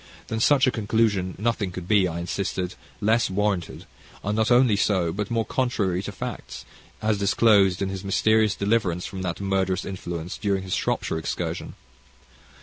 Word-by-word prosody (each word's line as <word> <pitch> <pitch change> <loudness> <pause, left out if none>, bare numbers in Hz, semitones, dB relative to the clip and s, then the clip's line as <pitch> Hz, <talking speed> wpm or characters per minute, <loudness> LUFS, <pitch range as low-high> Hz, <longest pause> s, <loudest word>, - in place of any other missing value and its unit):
Than 110 - -2
such 135 +3 +4
a 130 - +3
conclusion 105 -4 0
nothing 105 -2 -1
could 90 -1 -7
be, 100 -3 +4
I 85 -1 -4
insisted, 90 +1 -3 0.3
less 110 +3 +2
warranted; 100 -2 -1 0.4
and 105 +2 -1
not 110 0 +2
only 120 -3 +5
so, 95 -5 +1
but 105 +2 -3
more 115 -1 0
contrary 105 -8 0
to - - -5
facts, 60 0 -7 0.4
as 110 -2 +1
disclosed 100 -2 +4
in 95 - -1
his 95 0 -5
mysterious 110 +2 +2
deliverance 100 -4 0
from 95 - -6
that 90 -3 -3
murderous 95 -1 0
influence 85 -3 -5
during 100 -2 0
his 95 -1 -4
Shropshire 80 - -1
excursion. 80 - -4
100 Hz, 160 wpm, -25 LUFS, 90-110 Hz, 0.4 s, only